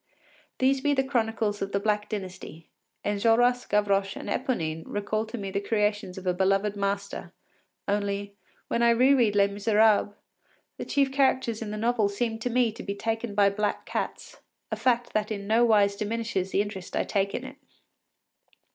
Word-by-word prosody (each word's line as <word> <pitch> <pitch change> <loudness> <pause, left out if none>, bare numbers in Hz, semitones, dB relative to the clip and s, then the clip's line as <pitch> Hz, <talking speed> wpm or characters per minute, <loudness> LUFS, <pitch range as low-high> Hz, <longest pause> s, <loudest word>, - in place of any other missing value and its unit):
These 265 +1 +2
be 290 +1 +2
the 270 - +2
chronicles 225 -5 -1
of 195 0 -3
the 200 - +2
Black 210 0 0
Dynasty. 185 -5 -7 0.4
Enjolras, 230 +4 +2
Gavroche, 200 -1 +1
and - - -7
Eponine 165 - -1
recall 215 +2 -2
to 240 - -6
me 195 -3 -5
the 200 - -1
creations 210 -3 -1
of 190 - -8
a 180 - +2
beloved 195 +3 +1
master; 200 0 -3 0.6
only, 200 0 -1 0.3
when 235 - 0
I 235 - +5
re 250 +4 +5
read 230 -6 +3
“Les 200 -1 +5
Misérables,” 205 0 +3 0.6
the - - -4
chief 275 -1 +1
characters 260 -4 +1
in 220 - -4
the 210 - -4
novel 225 -2 +1
seem 225 +2 -2
to 245 - -2
me 240 -1 +2
to 215 - -9
be 200 - -4
taken 225 0 -3
by 200 -1 +4
black 210 +1 -2
cats, - - -5 0.3
a - - 0
fact 240 +2 0
that 215 0 0
in 200 -2 -4
no 225 +3 +3
wise 205 -3 +4
diminishes 210 -3 -2
the 200 - +2
interest 195 -3 -7
I - - +1
take 200 -1 -1
in - - -4
it. - - -10
210 Hz, 180 wpm, -27 LUFS, 200-230 Hz, 0.6 s, I